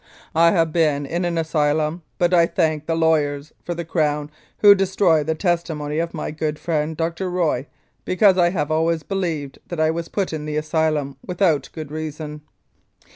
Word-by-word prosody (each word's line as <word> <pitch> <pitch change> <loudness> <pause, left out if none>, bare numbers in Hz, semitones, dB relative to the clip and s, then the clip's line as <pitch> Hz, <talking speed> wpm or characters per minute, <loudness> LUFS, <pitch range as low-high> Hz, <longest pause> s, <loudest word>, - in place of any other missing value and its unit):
I 165 +1 +5
have 165 -3 +1
been 150 -4 +2
in 170 +5 -2
an 170 -1 -1
asylum, 155 0 0 0.2
but 175 0 +2
I 170 -1 +5
thank 155 -4 0
the 165 - +1
lawyers 155 -3 +1
for 175 - -4
the 170 0 -5
Crown, 150 -2 0 0.3
who 205 -1 +8
destroyed 190 -5 +2
the 160 - +1
testimony 160 -3 -1
of 170 0 -2
my 155 - -4
good 155 0 -3
friend 155 -1 -2
Dr. 170 +3 -2
Roy, 160 -7 0 0.4
because 190 +1 +4
I 175 -2 +4
have 155 -4 -2
always 160 0 +1
believed 165 -8 -3
that 175 - -5
I 155 0 +3
was 165 0 -4
put 195 -5 -2
in 155 -1 -4
the 150 0 -3
asylum 155 -3 0
without 170 -6 +1
reason. 155 -1 -6
160 Hz, 175 wpm, -22 LUFS, 150-170 Hz, 0.4 s, who